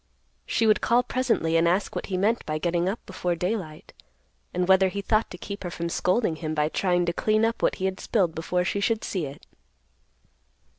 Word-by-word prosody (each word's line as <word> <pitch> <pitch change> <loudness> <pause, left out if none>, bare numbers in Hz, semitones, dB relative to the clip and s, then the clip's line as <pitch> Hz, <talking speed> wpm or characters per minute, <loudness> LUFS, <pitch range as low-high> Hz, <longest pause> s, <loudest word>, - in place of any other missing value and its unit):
She 225 - +1
would 215 -1 +4
call 240 +2 +3
presently 235 -11 +1
and 165 +1 +3
ask 185 +4 0
what - - -3
he 185 - -2
meant 215 +5 +1
by 155 0 -1
getting 175 +2 0
up 210 - -5
before 180 -2 -2
daylight, 180 -3 -4 0.6
and 180 0 -1
whether 190 0 +5
he 200 +2 -4
thought 215 +2 +1
to 180 - -9
keep 200 +2 -7
her 175 - -3
from 170 0 -4
scolding 180 -1 +1
him 155 0 -3
by 150 0 +1
trying 180 0 +1
to 170 - -1
clean 215 +4 +2
up 230 +1 -1
what - - +2
he 190 - -3
had 190 0 -2
spilled 185 -7 +1
before 180 +3 -1
she 200 - -1
should 225 +2 0
see 175 -7 -2
it. 140 - -11
185 Hz, 210 wpm, -26 LUFS, 170-210 Hz, 0.6 s, whether